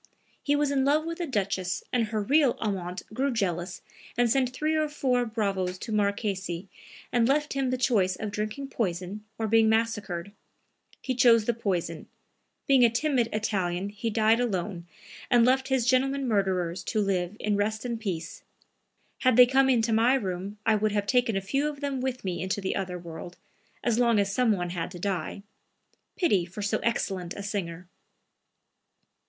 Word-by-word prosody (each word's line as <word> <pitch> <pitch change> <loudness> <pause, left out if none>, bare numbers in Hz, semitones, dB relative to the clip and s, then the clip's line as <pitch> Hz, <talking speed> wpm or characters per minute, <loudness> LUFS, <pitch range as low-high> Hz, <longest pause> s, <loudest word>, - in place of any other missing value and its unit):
He 290 - +1
was 290 -1 +1
in 270 -1 +2
love 300 +3 +2
with 335 +1 -5
a 345 - -2
duchess 195 -6 -1
and 235 -3 +2
her 215 -1 -2
real 280 +2 +3
amant 185 -4 -3
grew 270 +5 0
jealous 180 -5 -2 0.3
and 245 0 +4
sent 260 0 +2
three 305 +5 -1
or 310 -1 +1
four 250 -4 0
bravos 195 -5 -1
to 220 - -7
Marquesi 200 -3 -1 0.4
and 235 -1 +3
left 295 +3 +1
him 270 -1 0
the 255 - 0
choice 205 -8 +2
of 215 -2 -5
drinking 215 +7 -4
poison 190 -1 -3
or 225 - -1
being 225 0 +4
massacred. 210 -5 -1 0.7
He 260 - -1
chose 235 -3 +5
the 240 - +1
poison. 180 -7 -3 0.6
Being 270 -2 +5
a 235 - +7
timid 245 -1 +1
Italian 195 -3 -1
he 210 +3 -3
died 220 +1 +3
alone 190 -6 -2 0.4
and 240 -2 +5
left 260 +1 +2
his 265 -3 +1
gentlemen 270 +2 +2
murderers 190 -5 0
to 220 - -1
live 195 -1 -1
in 210 -1 0
rest 215 +3 -1
and 235 -2 -3
peace. 175 -6 -4 0.8
Had 255 -3 +3
they 250 - +10
come 265 +1 +3
into 230 -3 +2
my 235 +4 +4
room, 195 -3 -3
I 225 - +4
would 215 0 +1
have 205 -1 0
taken 240 -2 +2
a - - -1
few 275 +10 0
of 290 -2 -8
them 280 -2 -2
with 255 -3 -3
me 175 -3 -2
into 190 +2 -1
the 190 -1 -2
other 185 -2 -3
world, 170 0 -9 0.5
as 235 -1 +1
long 235 -2 +4
as 200 -1 +1
some 245 0 +3
one 175 -4 -1
had 170 -1 -3
to 180 -1 -9
die. 200 +1 -3 0.7
Pity 210 - +2
for 185 +4 -7
so 210 +2 0
excellent 190 -6 -2
a 200 - -6
singer!" 180 -4 -4
215 Hz, 180 wpm, -27 LUFS, 190-250 Hz, 0.8 s, they